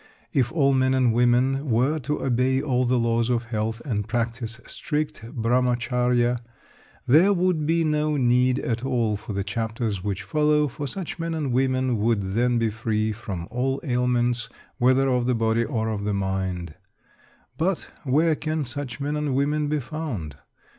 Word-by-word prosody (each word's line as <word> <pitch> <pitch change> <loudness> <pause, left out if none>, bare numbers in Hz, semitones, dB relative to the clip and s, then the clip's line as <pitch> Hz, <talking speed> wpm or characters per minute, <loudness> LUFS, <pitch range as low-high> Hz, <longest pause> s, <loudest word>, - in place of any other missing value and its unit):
If 125 -3 +2
all 140 -4 +3
men 130 0 +2
and 125 -3 +3
women 125 +4 +2
were 130 +7 +2
to 150 +2 -3
obey 130 +1 +2
all 130 -3 +1
the 125 +1 +2
laws 115 0 +1
of 120 -1 +1
health, 115 0 -3
and 105 -6 -2
practice 115 0 -2
strict 150 -4 -3
Brahmacharya, 125 0 +1 0.7
there 165 +10 +5
would 175 -4 +1
be 165 +1 +2
no 150 -1 +1
need 125 0 +3
at 120 0 -2
all 120 -5 +1
for 105 +1 -6
the 100 0 -1
chapters 110 -1 -3
which 100 -2 -3
follow, 150 -1 +2
for 145 +2 -5
such 180 +3 -5
men 165 0 -2
and 150 -5 -2
women 130 -2 +1
would 100 -3 0
then 120 +2 +2
be 115 -2 +1
free 110 0 -1
from 95 -5 -6
all 135 +3 -1
ailments, 120 -3 0 0.3
whether 130 +2 +4
of 125 -2 +1
the 125 - +2
body 115 0 +1
or 110 -4 -2
of 105 -2 -3
the 105 0 -1
mind. 95 -4 -2 0.9
But 180 +2 0 0.2
where 155 +4 +3
can 155 0 -2
such 135 -1 -5
men 145 +1 -2
and 150 -3 -1
women 145 +2 +1
be 150 0 0
found? 125 - -5
125 Hz, 165 wpm, -24 LUFS, 115-145 Hz, 0.9 s, there